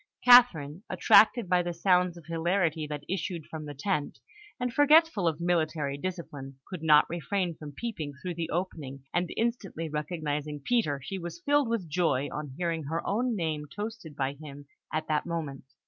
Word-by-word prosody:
Catherine, 190 - +6
attracted 225 -1 +5
by 180 0 +3
the 175 -1 -4
sounds 180 0 +2
of 170 - -13
hilarity 165 -1 0
that 150 -1 -5
issued 175 -3 -3
from 155 -1 -7
the 145 -1 -7
tent, 150 0 -2 0.4
and 250 -1 -2
forgetful 295 - +5
of 160 -1 0
military 160 -4 0
discipline, 145 -5 -6
could 185 -4 -7
not 150 -2 +6
refrain 175 +1 -2
from 150 -2 -10
peeping 160 -7 -5
through 180 +2 -4
the 165 -1 -4
opening; 150 -7 -4
and 175 -1 0
instantly 215 -8 -2
recognising 150 -1 -3
Peter, 145 - 0
she 195 +7 -5
was 175 - -7
filled 290 -6 +2
with 225 -7 -1
joy 150 -4 +1
on 150 -3 -6
hearing 165 -3 -2
her 160 +4 -3
own 235 +3 0
name 155 -5 -2
toasted 205 -3 -7
by 135 0 -1
him 145 -1 -11 0.3
at 155 0 -2
that 155 +1 0
moment. 155 -6 -4
165 Hz, 170 wpm, -29 LUFS, 150-190 Hz, 0.4 s, Catherine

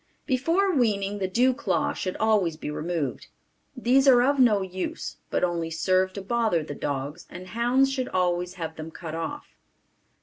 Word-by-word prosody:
Before 330 +9 +1
weaning 205 -6 +1
the 190 - 0
dew 250 +7 +3
claw 275 - 0
should 185 - -4
always 205 -7 +2
be 150 - -5
removed. 155 -3 -3 0.5
These 260 +3 +3
are 245 -2 +7
of 280 +2 +2
no 215 -6 +4
use 185 0 -5
but - - -1
only 170 -2 0
serve 185 +3 +1
to 200 - -6
bother 220 -6 +1
the 150 - -6
dogs 145 +3 -4
and 180 +1 -9
hounds 250 +4 +2
should 260 -2 -2
always 180 0 0
have 160 -3 -6
them 160 +1 -6
cut 160 -1 -8
off. 285 - -5
190 Hz, 170 wpm, -26 LUFS, 170-250 Hz, 0.5 s, are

